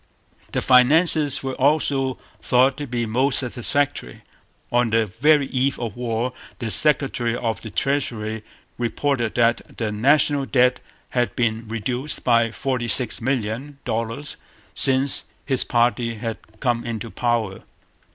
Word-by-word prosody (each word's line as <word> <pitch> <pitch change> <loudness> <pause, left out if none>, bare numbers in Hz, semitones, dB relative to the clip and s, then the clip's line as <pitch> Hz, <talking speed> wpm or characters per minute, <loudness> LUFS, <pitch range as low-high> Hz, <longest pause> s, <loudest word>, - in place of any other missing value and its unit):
The - - -2
finances 145 +3 +4
were 135 -1 -3
also 135 -1 +1 0.2
thought 130 +2 +3
to 145 -1 -5
be 120 -1 -2
most 130 +5 +3
satisfactory. 130 - 0 0.5
On 120 -1 +2
the 110 0 +2
very 145 +9 +2
eve 135 +1 -1
of 115 -4 -5
war 120 +1 -2 0.2
the 115 -4 -4
Secretary 135 -5 +1
of 115 -2 -3
the 110 - -8
Treasury 110 -5 -2 0.4
reported 120 -2 -1
that 120 -1 0
the 110 -2 -2
national 140 +5 +2
debt 125 -1 +2 0.3
had 120 -5 -1
been 115 -1 -1
reduced 120 +6 -3
by 115 -2 +3
forty 125 +1 -3
six 115 +2 +4
million 130 +3 -3
dollars 115 +6 -4 0.4
since 135 +1 +3 0.2
his 130 -3 0
party 120 -1 0
had 115 0 -5 0.2
come 120 -3 0
into 115 -1 -5
power. 115 -5 -2
125 Hz, 130 wpm, -22 LUFS, 115-135 Hz, 0.5 s, finances